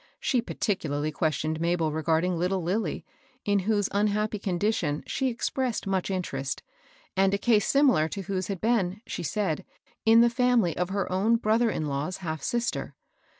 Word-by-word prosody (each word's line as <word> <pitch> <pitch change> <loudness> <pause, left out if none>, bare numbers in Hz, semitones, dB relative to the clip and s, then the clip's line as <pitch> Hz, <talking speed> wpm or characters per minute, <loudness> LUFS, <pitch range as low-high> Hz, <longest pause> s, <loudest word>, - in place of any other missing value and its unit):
She 250 -3 +1
particularly 155 -10 -2
questioned 155 0 -1
Mah^l 170 -2 +1
regarding 160 +3 +1
Uttle 180 +2 0
Lilly, 185 -1 -1 0.4
in 205 -1 +3
whose 205 -3 +2
unhappy 210 +1 0
condition 180 -5 -1
she 265 - -1
expressed 250 -1 -1
much 195 -1 -1
interest, 140 -8 -3 0.5
and 195 +1 +3
a - - 0
case 215 -1 +3
similar 270 - +4
to 200 +2 -5
whose 190 -1 -2
had 195 -3 -3
been, 210 -4 +1
she - - -5
said, 175 -1 -1 0.4
in 225 +1 +7
the 235 - +5
family 240 - +2
of 180 0 -1
her 195 -1 -2
own 200 +5 +3
brother 225 +1 +2
in 155 - -2
law's 145 +5 -2
half 160 -5 -4
sister. 240 +9 -2
195 Hz, 160 wpm, -27 LUFS, 165-220 Hz, 0.5 s, in